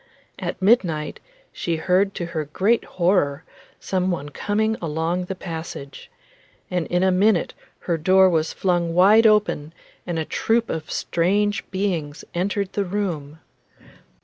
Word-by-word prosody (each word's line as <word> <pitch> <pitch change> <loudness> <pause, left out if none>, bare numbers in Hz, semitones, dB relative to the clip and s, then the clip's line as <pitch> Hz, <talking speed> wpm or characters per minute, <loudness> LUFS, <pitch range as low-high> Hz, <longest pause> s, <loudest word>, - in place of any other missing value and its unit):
At - - -4
midnight 175 -8 +2 0.3
she 170 - -2
heard 185 +4 +1
to 175 - -3
her 165 -3 -3
great 195 +10 +1
horror 170 -5 +1 0.4
some 185 -1 -1
one 145 -5 -3
coming 215 +7 0
along 165 +3 -1
the 190 - -5
passage, 160 -6 -7 0.6
and 180 -2 -1
in 180 +1 +1
a 190 - +4
minute 190 0 +2 0.3
her 170 -2 -1
door 190 +4 +5
was 160 -3 +1
flung 175 -3 0
wide 210 +5 +6
open 205 -8 +1 0.3
and 175 -2 -2
a 160 - -1
troop 230 +7 0
of 160 0 -5
strange 205 +5 0
beings 175 -7 -3
entered 195 +2 -1
the 205 - 0
room. 175 -7 -3
180 Hz, 140 wpm, -22 LUFS, 160-200 Hz, 0.6 s, wide